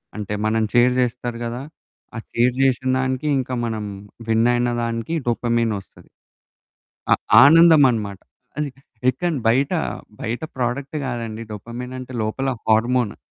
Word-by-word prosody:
అంటే 105 -1 -4
మననీ 110 0 +1
చీర్ 125 +1 +5
చేస్తారు 120 -1 -2
గదా! 120 +2 -4 0.5
ఆ - - -4 0.2
చీర్ 120 +1 +3
చేసిన 130 -1 +1
దానికి 130 +2 -1
ఇంక 130 -1 -2 0.2
మనం 110 -2 -3 0.4
వినైన 120 +2 +2
దానికి 115 +6 -3
డోపమైన్ 115 -1 +1
ఓస్తది. 95 - -18 1.0
అ - - +9 0.3
ఆనందమన్నమాట. 140 - +5 0.4
అది 150 -1 -1 0.4
ఎక్కడ 170 +7 -2 0.2
బయట 135 +5 +2 0.5
బయట 115 +5 -3
ప్రొడక్ట్ 130 +4 -2
కాదండి. 115 -3 -4
డోపమైన్ 120 +4 -7
అంటే 130 0 -9
లోపల 120 +5 -2 0.2
హార్మోను. 120 +1 +2
120 Hz, 120 wpm, -21 LUFS, 115-130 Hz, 1.0 s, అ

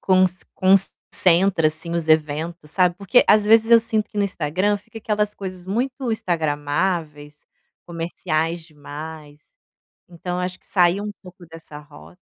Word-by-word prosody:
conc 185 -1 +3 0.2
concentra, 185 -2 +2
assim, 160 +2 -7
os 165 -2 -2
eventos, 155 +1 0
sabe, 180 -1 +2
porque 200 +5 +3
às 210 0 +5
vezes 225 +2 +4
eu 230 - +9
sinto 220 -1 -2
que - - -13
no 200 - +3
Instagram, 185 +3 0
fica 215 +2 -12
aquelas 210 -1 -1
coisas 185 -2 -8
muito 245 +7 -1 0.2
instagramáveis, 150 -3 -2 0.4
comerciais 165 -1 -2
demais. 150 0 -10 0.7
Então 180 +1 -5
acho 180 0 -4
que - - -23
sair 180 0 +2
um 210 - -4
pouco 180 -2 -14
dessa 160 -2 -12
rota 85 - -16
175 Hz, 140 wpm, -22 LUFS, 155-195 Hz, 0.7 s, eu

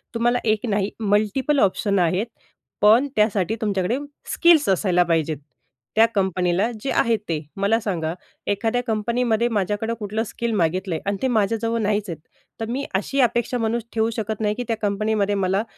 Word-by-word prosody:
तुम्हाला 240 +1 +2
एक 215 +1 +1
नाही 200 -1 0
मल्टीपल 215 +7 +1
ऑप्शन 200 -1 +2
आहेत. 180 +4 +1 0.6
पण 225 +7 +6
त्यासाठी 210 -1 +2
तुमच्याकडे 200 +1 0 0.4
स्किल्स 335 - +5
असायला 185 -2 +3
पाहिजेत. 160 -3 0 0.6
त्या 225 - +7
कंपनीला 190 +2 +1
जे 270 - -2
आहे 230 -1 +2
ते. 160 -2 0 0.2
मला 200 +3 +2
सांगा 170 -7 -2 0.4
एखाद्या 225 +4 0
कंपनीमध्ये 230 +1 +1
माझ्याकडं 210 +1 -1
कुठलं 215 +1 -2
स्किल 235 +1 -4
मागितलंय 180 -1 0
आणि 200 0 -1
ते 265 - +2
माझ्याजवळ 230 0 0
नाहीच 210 -1 0
आहेत. 165 -3 -5 0.4
तर 225 - -2
मी 265 +4 -2
अशी 210 +8 -1
अपेक्षा 240 0 +1
म्हणून 230 0 -1
ठेवू 225 0 +1
शकत 220 -1 -3
नाही 210 -1 +1
की 245 - -3
त्या 225 - -1
कंपनीमध्ये 205 0 0
मला 195 +1 +1
210 Hz, 160 wpm, -22 LUFS, 195-230 Hz, 0.6 s, त्या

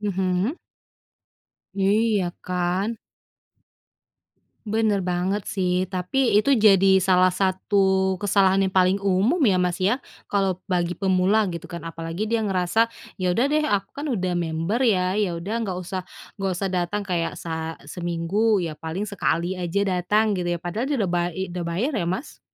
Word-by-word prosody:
Mhm. 190 - -1 1.2
Iya, 200 0 +2 0.2
kan? 180 +5 -1 1.7
Bener 210 -2 +1
banget, 185 +3 -1
sih. 180 -1 0
Tapi 190 +8 0
itu 275 +6 +3
jadi 195 -3 +6
salah 185 -1 +4
satu 190 0 +1
kesalahan 195 -1 +3
yang 190 - -3
paling 185 +1 +4
umum 200 - +2
ya, 190 -4 +4
Mas, 180 -1 0
ya? 220 +9 +1 0.3
Kalau 195 -3 +1
bagi 180 -1 -1
pemula 195 +2 +2
gitu, 170 +1 -7
kan? 170 -1 -6
Apalagi 165 +4 -4
dia 230 0 0
ngerasa, 195 +3 +1 0.3
"Ya, 180 - +1
udah 245 - +3
deh, 305 +1 +1
aku 200 -8 0
kan 285 - -6
udah 185 -6 -1
member 170 +7 -1
ya, 185 -6 +2
ya 190 -5 0
udah 190 +6 -5
nggak 190 -4 -3
usah 185 +1 -4 0.4
nggak 195 -1 0
usah 195 +2 -2
datang 180 +3 -1
kayak 175 -3 -1
sa 160 -1 -4
seminggu, 175 +6 0
ya 165 -3 -3
paling 160 +6 -4
sekali 180 -3 -1
aja 180 +2 -1
datang", 210 +4 +1
gitu, 180 -1 -2
ya? - - -18
Padahal 185 +8 -3
dia 290 - 0
udah 195 -4 0
bay 175 -1 +1
eee, 190 +3 -4
udah 180 -1 -4
bayar 185 - -1
ya, 175 -5 -1
Mas? 185 - -4
190 Hz, 160 wpm, -24 LUFS, 180-205 Hz, 1.7 s, jadi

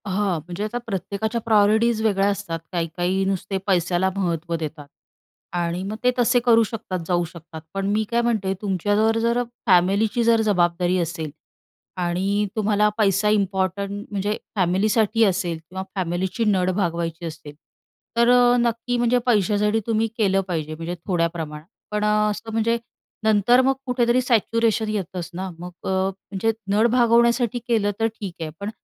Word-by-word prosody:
हां. 190 -3 0
म्हणजे 175 +3 -5
आता 215 +3 -3
प्रत्येकाच्या 210 +3 -3
प्रायॉरिटीज 220 +1 +3
वेगळ्या 200 -2 +2
असतात. 200 -5 -3
काही-काही 175 +2 -1
नुसते 195 0 -2
पैशाला 180 0 +2
महत्त्व 170 -3 -1
देतात 155 -2 -6 0.7
आणि 175 0 -1
मग 205 +2 -4
ते 250 - +4
तसे 245 +1 +4
करू 230 -1 +6
शकतात, 215 -4 -4
जाऊ 175 -1 +1
शकतात. 165 -1 -11
पण 195 0 -2
मी 215 +1 +1
काय 235 0 +2
म्हणते? 215 -5 0
तुमच्यावर 205 +3 +1
जर 235 +1 +1 0.3
फॅमिलीची 200 +5 +3
जर 230 -1 +4
जबाबदारी 180 -3 +1
असेल 165 -2 -3 0.7
आणि 190 +4 0
तुम्हाला 210 -1 +2
पैसा 205 -1 +2
इम्पॉर्टंट 200 0 -1
म्हणजे 205 +1 -1 0.2
फॅमिलीसाठी 210 +4 +2
असेल 180 -4 0
किंवा 180 +4 -7
फॅमिलीची 185 +4 -1
नड 185 -3 +2
भागवायची 170 -3 -2
असेल. 155 -2 -8 0.6
तर 235 0 +4
अ, 245 0 +5
नक्की 235 +1 0
म्हणजे 240 +1 +2
पैशासाठी 210 -1 +2
तुम्ही 225 0 +1
केलं 195 -3 +2
पाहिजे 155 -3 -3
म्हणजे 165 +2 -5
थोड्या 175 -3 +2
प्रमाणात. 155 -2 -6 0.3
पण 210 0 -1
अ, 210 0 +2
असं 225 +2 -6
म्हणजे 225 +1 +1 0.5
नंतर 220 +3 +4
मग 265 +1 +3
कुठेतरी 250 -1 +2
सॅच्युरेशन 230 -2 +1
येतंच 185 -4 -4
ना. 190 +2 -4
मग 180 +1 -7
अ, - - -3
म्हणजे 190 +3 -1 0.2
नड 215 +3 +4
भागवण्यासाठी 235 0 +3
केलं 215 -4 +2
तर 225 - +3
ठीक 210 -4 -7
आहे. 160 - -3
पण 200 - -4
200 Hz, 150 wpm, -23 LUFS, 180-225 Hz, 0.7 s, करू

